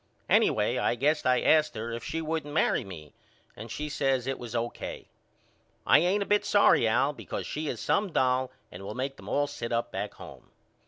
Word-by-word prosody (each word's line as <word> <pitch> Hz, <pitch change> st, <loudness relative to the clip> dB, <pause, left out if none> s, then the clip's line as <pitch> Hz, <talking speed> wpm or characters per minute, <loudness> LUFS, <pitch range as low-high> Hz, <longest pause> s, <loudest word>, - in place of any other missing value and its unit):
Anyway 110 Hz, +4 st, +3 dB
I 120 Hz, -, +1 dB
guess 150 Hz, +3 st, +1 dB
I 125 Hz, -1 st, +3 dB
asked 155 Hz, -4 st, +3 dB
her 115 Hz, +2 st, -4 dB
if 115 Hz, 0 st, -5 dB
she 160 Hz, 0 st, -3 dB
wouldn't 155 Hz, -2 st, -3 dB
marry 160 Hz, -, +2 dB
me 80 Hz, -6 st, -11 dB, 0.4 s
and 115 Hz, -, -9 dB
she 150 Hz, +7 st, -4 dB
says 135 Hz, -4 st, 0 dB
it 135 Hz, 0 st, -3 dB
was 120 Hz, -1 st, -7 dB
O.K. 120 Hz, 0 st, -4 dB, 0.8 s
I -, -, +6 dB
ain't 185 Hz, +5 st, +2 dB
a -, -, -9 dB
bit 205 Hz, +1 st, +2 dB
sorry 200 Hz, -, +4 dB
Al 130 Hz, +6 st, +2 dB
because -, -, -6 dB
she 155 Hz, +1 st, -4 dB
is 120 Hz, -, -3 dB
some 200 Hz, -2 st, 0 dB
doll 130 Hz, -2 st, +1 dB, 0.2 s
and 90 Hz, -, -9 dB
will 100 Hz, +2 st, -7 dB
make 135 Hz, +2 st, -3 dB
them -, -, -10 dB
all 145 Hz, 0 st, +2 dB
sit 145 Hz, -5 st, -6 dB
up 115 Hz, 0 st, -1 dB
back 100 Hz, +2 st, -4 dB
home. -, -, -12 dB
130 Hz, 205 wpm, -28 LUFS, 115-150 Hz, 0.8 s, I